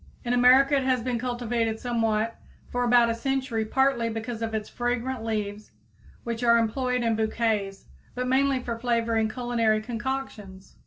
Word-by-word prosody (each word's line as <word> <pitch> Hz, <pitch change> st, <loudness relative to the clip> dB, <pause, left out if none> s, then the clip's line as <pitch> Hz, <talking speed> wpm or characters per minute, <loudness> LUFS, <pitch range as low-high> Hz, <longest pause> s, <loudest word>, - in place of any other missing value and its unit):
In 240 Hz, -, 0 dB
America 260 Hz, +3 st, +5 dB
it 275 Hz, -, +2 dB
has 255 Hz, -2 st, +1 dB
been 245 Hz, -2 st, -1 dB
cultivated 235 Hz, -2 st, -2 dB
somewhat 225 Hz, -2 st, 0 dB, 0.4 s
for 245 Hz, 0 st, 0 dB
about 240 Hz, -1 st, +4 dB
a -, -, 0 dB
century 255 Hz, -2 st, -2 dB
partly 265 Hz, 0 st, +1 dB
because 225 Hz, +1 st, -5 dB
of 225 Hz, -1 st, -2 dB
its 215 Hz, -1 st, -3 dB
fragrant 245 Hz, 0 st, -2 dB
leaves 210 Hz, -2 st, -4 dB, 0.5 s
which 235 Hz, 0 st, -4 dB
are 235 Hz, -1 st, +5 dB
employed 250 Hz, +2 st, 0 dB
in 230 Hz, -1 st, +1 dB
bouquets, 220 Hz, -3 st, -1 dB, 0.3 s
but 250 Hz, 0 st, -2 dB
mainly 270 Hz, +1 st, +2 dB
for 235 Hz, -2 st, -5 dB
flavoring 230 Hz, -2 st, +1 dB
culinary 230 Hz, -2 st, 0 dB
concoctions. 215 Hz, -5 st, -6 dB
235 Hz, 155 wpm, -26 LUFS, 220-250 Hz, 0.5 s, America